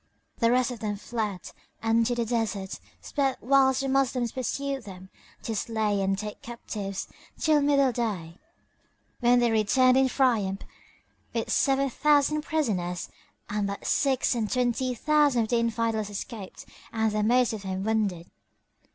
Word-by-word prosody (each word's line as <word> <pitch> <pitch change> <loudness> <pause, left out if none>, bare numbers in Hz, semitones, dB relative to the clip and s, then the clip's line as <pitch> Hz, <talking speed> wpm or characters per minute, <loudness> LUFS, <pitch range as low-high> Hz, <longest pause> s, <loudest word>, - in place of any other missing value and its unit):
The 230 - +3
rest 250 +1 +2 0.3
fled 215 -6 -4 0.3
and 225 +1 +2
to 245 - 0
the 235 -1 -1
deserts 220 -4 -2 0.2
sped 275 -3 -1
whilst 265 +1 +3
the 270 - -2
Moslems 260 -3 +1
pursued 275 +1 -3
them 190 -2 -11 0.3
to 225 - -3
slay 215 -2 0
and 195 0 0
take 210 +1 -6
captives 205 -4 -6 0.3
till 305 -2 +3
middle 280 -2 +3
day, 200 -8 -3 0.8
when 245 +1 +4
they 240 -1 +3
returned 255 +4 +4
in 265 0 +4
triumph 225 -8 +1 0.7
with 230 - -1
seven 275 0 +2
thousand 300 +2 +3
prisoners; 205 - -2 0.4
and 205 -1 -1
but 200 0 -6
six 265 -2 +2
and 225 -3 -2
twenty 250 0 0
thousand 290 -2 +3
of 220 - -5
the 240 - +2
Infidels 230 -2 -1
escaped 205 -1 -7 0.3
and 220 -1 0
the 210 0 0
most 245 +2 +3
of 215 - -5
them 190 -1 -4
wounded. 205 -6 0
230 Hz, 145 wpm, -27 LUFS, 210-265 Hz, 0.8 s, when